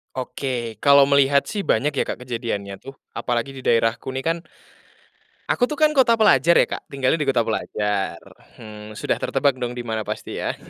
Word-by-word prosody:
Oke 125 -4 -4
kalau 140 +1 +6
melihat 140 0 +4
sih 210 - -5
banyak 150 - +1
ya 140 - -1
Kak - - -3
kejadiannya 115 -5 -4
tuh 135 0 -11 0.2
apalagi 120 +2 -2
di 135 - -10
daerahku 115 +1 0
nih 130 - -3
kan, 165 +1 0 1.1
aku 245 - +2
tuh 300 - -4
kan 305 0 +3
kota 260 -5 +4
pelajar 170 - +4
ya - - +6
Kak - - -6
tinggalnya 135 +3 0
di 150 - -1
kota 130 -3 +2
pelajar, 105 -4 -2 0.4
hmm, 105 -1 -11
sudah - - -2
tertebak 140 -3 0
dong 125 -1 -3
dimana 110 -3 -4
pasti - - -5
ya - - -2
130 Hz, 180 wpm, -22 LUFS, 115-140 Hz, 1.1 s, kalau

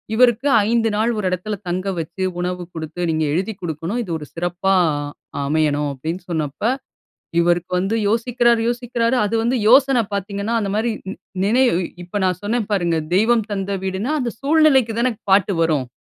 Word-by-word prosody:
இவருக்கு 245 +3 +4 0.2
5 230 -1 +2
நாள் 225 +3 +1
1 210 - -2
எடத்துல 185 +4 -3
தங்க 185 +3 -2
வச்சு, 170 +4 -4 0.2
உணவு 180 0 -2
குடுத்து, 160 +2 -6
"நீங்க 155 0 0
எழுதிக் 195 +4 -2
குடுக்கணும், 170 +7 -3
இது 180 - -7
ஒரு 150 - -9
சிறப்பா 175 +3 0 0.7
அமையணும்." 150 -1 +1
அப்படீன்னுசொன்னப்ப, 160 0 -4 0.8
இவருக்கு 175 +1 +1
வந்து 195 +5 0
யோசிக்கிறாரு 235 +1 +2
யோசிக்கிறாரு 240 0 0
அது 215 +2 -2
வந்து 245 +3 +1
யோசனை 265 -1 +5
பார்த்தீங்கன்னா, 200 +3 -2
அந்த 200 -2 -2
மாரி 225 +2 +1 0.2
நி - - -5 0.3
நினைவு 240 -2 +3 0.3
இப்ப 190 +4 -4
நான் 180 -2 0
சொன்னேன் 220 +1 -1
பாருங்க, 170 -4 +1 0.2
"தெய்வம் 225 +1 +3
தந்த 195 0 -2
வீடுன்னா", 190 +9 -2
அந்த 240 -3 -2
சூழ்நிலைக்கு 275 -6 +4
தானே 245 0 +2 0.2
பாட்டு 195 0 +4
வரும். 150 -6 +1
200 Hz, 155 wpm, -20 LUFS, 175-235 Hz, 0.8 s, யோசனை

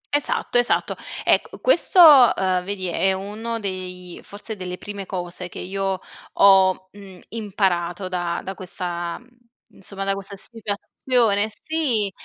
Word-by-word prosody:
Esatto, 290 -3 0
esatto. 245 0 +1 0.3
Ecco - - +1
questo, - - +3 0.4
uhm, 185 -1 0
vedi 195 -1 -3
è 190 +3 +1
uno 215 +4 -5
dei 180 -2 -6
forse 210 +2 -8
delle 180 -1 -6
prime 200 -1 -7
cose 180 -1 -5
che - - -10
io 195 0 -3 0.3
ho, 190 -1 +5
mhmm, 195 -3 -13
imparato 190 -4 -1
da 175 -1 -2
da 190 - -5
questa 175 -2 -4
mhmm, 245 - -22 0.5
insomma 195 0 -8
da 195 0 0
questa 195 +1 -8
situazione, 220 +1 -1
sì, 255 -11 0
195 Hz, 130 wpm, -22 LUFS, 185-210 Hz, 0.5 s, ho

